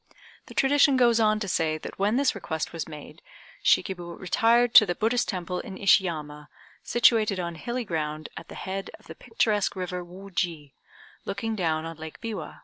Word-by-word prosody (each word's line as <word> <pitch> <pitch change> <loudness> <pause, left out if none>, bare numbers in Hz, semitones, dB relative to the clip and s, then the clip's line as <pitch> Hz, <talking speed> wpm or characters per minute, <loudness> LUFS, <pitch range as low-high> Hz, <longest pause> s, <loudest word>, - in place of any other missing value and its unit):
The - - -12
tradition 280 0 +4
goes 235 -2 +4
on 215 -1 +3
to 200 - -2
say 160 -3 0
that 155 - -9
when 205 +3 +2
this 275 +1 +2
request 160 -7 -4
was 165 - -4
made 150 -2 -11 0.4
Shikib 190 -3 +2
retired 225 +7 +1
to 215 - +9
the 175 - -1
Buddhist 230 +5 0
temple 180 -2 -3
in 190 - -8
Ishiyama, 155 -7 +1 0.3
situated 220 -4 +3
on 170 -1 -3
hilly 240 +9 -4
ground 155 -3 -3
at - - -9
the - - -10
head 195 +1 -5
of - - -23
the - - -9
picturesque 210 - 0
river 180 -1 -4
Wooji, 175 -5 -5 0.5
looking 220 +3 -3
down 160 -5 -1
on 165 -1 -7
Lake 160 0 -9
Biwa. 225 -3 -6
190 Hz, 175 wpm, -26 LUFS, 165-225 Hz, 0.5 s, to